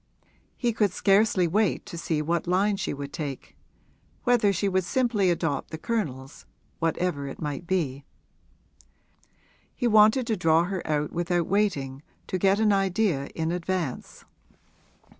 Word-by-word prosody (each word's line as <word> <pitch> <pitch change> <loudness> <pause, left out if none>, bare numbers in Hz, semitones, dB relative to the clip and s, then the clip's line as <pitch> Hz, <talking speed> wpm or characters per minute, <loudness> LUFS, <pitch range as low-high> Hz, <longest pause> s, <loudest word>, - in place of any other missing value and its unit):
He 240 -2 0
could 210 -3 +2
scarcely 195 -1 +3
wait 205 +3 +1
to - - -8
see 160 -2 -2
what 170 +2 -1
line 195 +3 +2
she 190 - -2
would 140 0 -6
take; 145 -5 -6 0.7
whether 240 -4 +3
she 200 +1 -1
would 190 -1 +1
simply 230 -3 +1
adopt 165 -4 -1
the 160 - -6
Colonel's, 150 - -4 0.3
whatever 165 -3 -1
it 135 - -8
might 150 +2 -4
be. 145 -7 -1 1.7
He 245 - -2
wanted 220 +2 +5
to 225 -2 0
draw 165 -3 +3
her 185 0 -3
out 150 -1 0
without 175 0 0
waiting, 155 -10 -1 0.2
to 185 - -3
get 195 +2 +3
an 215 -2 +3
idea 190 -7 +1
in 160 0 -1
advance. 175 -5 -4
180 Hz, 140 wpm, -26 LUFS, 155-205 Hz, 1.7 s, wanted